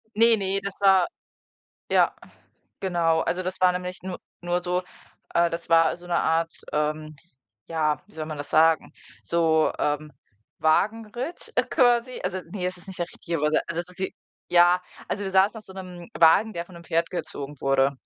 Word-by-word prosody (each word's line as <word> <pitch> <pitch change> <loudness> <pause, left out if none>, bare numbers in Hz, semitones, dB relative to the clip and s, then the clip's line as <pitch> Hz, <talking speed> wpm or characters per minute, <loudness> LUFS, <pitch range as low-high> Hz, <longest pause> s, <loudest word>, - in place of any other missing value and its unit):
Ne, 230 +1 +6
ne, 195 0 0
das 200 0 -4
war 195 -2 +5 0.8
ja, - - +4 0.6
genau. 170 -3 +1
Also, 185 +3 -1
das 185 +1 -4
war 185 - +6
nämlich 180 0 -5
nur 185 -1 -5 0.2
nur 175 0 0
so 180 +1 0 0.5
äh, 170 0 +4
das 170 0 -5
war 165 -1 +5
so 175 - -13
'ne 175 - 0
Art, 165 +1 +1 0.2
ähm, 155 0 -1 0.5
ja, 155 -2 0
wie - - -19
soll 155 -1 -5
man 155 -1 -6
das 145 - -7
sagen? 160 0 +3 0.3
So, 160 -2 +2
ähm, 150 +1 -1 0.5
Wagenritt, 225 - 0
äh, - - +4
quasi. 245 0 +2
Also, 185 0 -2
ne, 185 -2 -3
es 185 0 -3
ist 180 - -12
nicht 190 -1 -9
der 175 - 0
richtige 170 -1 -4
Überset 150 +1 +2
also, 170 - -1
es 175 - -5
ist 180 0 -6
wie 190 - -2 0.4
ja, 175 +1 +5 0.3
also, 205 - -2
wir 190 - -3
saßen 195 +4 +4
auf 215 - -10
so 190 - -12
'nem 180 -2 -9
Wagen, 170 +7 +5
der 170 0 -4
von 180 - -16
'nem 170 - -11
Pferd 165 +1 0
gezogen 145 -5 -5
wurde. 135 0 +3
175 Hz, 190 wpm, -25 LUFS, 160-190 Hz, 0.8 s, Ne